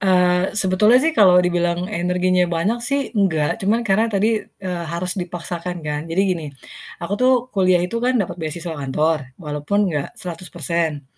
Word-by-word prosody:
Eee, 180 0 +2
sebetulnya 210 +4 +4
sih 325 - +2
kalau 195 - +6
dibilang 175 0 0
energinya 180 -1 +1
banyak 175 +8 0
sih, 275 +4 0
enggak, 180 -9 +1
cuman 220 +5 +1
karena 220 +2 +2
tadi, 215 +1 +1
eee, 180 -3 -6
harus 180 +1 -1
dipaksakan 175 0 -5
kan. 150 -1 -2
Jadi 165 +3 0
gini, 180 -5 -1 0.6
aku 170 - -5
tuh 255 +1 +5 0.2
kuliah 185 -3 +3
itu 230 +6 -3
kan 250 +1 +1
dapet 180 -6 -1
beasiswa 160 +2 -4
kantor 150 +4 +1 0.2
walaupun 165 +5 -1
enggak 145 -2 -2
100% 170 -3 -3
180 Hz, 155 wpm, -20 LUFS, 170-200 Hz, 0.6 s, kalau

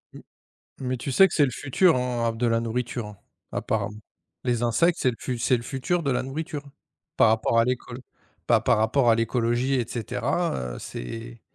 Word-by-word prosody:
M - - -11 0.6
mais 130 -1 -2
tu 130 +3 -4
sais 195 +7 +7
que - - -6
c'est 150 - +5
le 135 - 0
futur, 145 +6 +2
hein, 125 -2 -1
à - - 0
de 115 +2 -1
la 115 0 +2
nourriture, 115 0 -3
hein, 105 -1 -11 0.3
apparemment, 105 +1 -2 0.5
les 120 -2 0
insectes, 165 +9 +2
c'est 130 - +3 0.2
l 125 -2 -2
c'est 125 +2 +3
le 115 - -6
futur 140 +8 -1
de 140 - 0
la 125 - 0
nourriture 145 +1 -5 0.5
par 115 - +6
rapport 110 +1 +2
à 115 - +5
l'écolo 125 0 -3 0.5
pa - - +4
par - - +2
rapport 120 +3 +3
à - - +6
l'écologie 120 +3 0
et 125 -3 0
cetera, 65 - -2
heu, - - -8
c'est 115 - -7
120 Hz, 195 wpm, -25 LUFS, 115-135 Hz, 0.6 s, sais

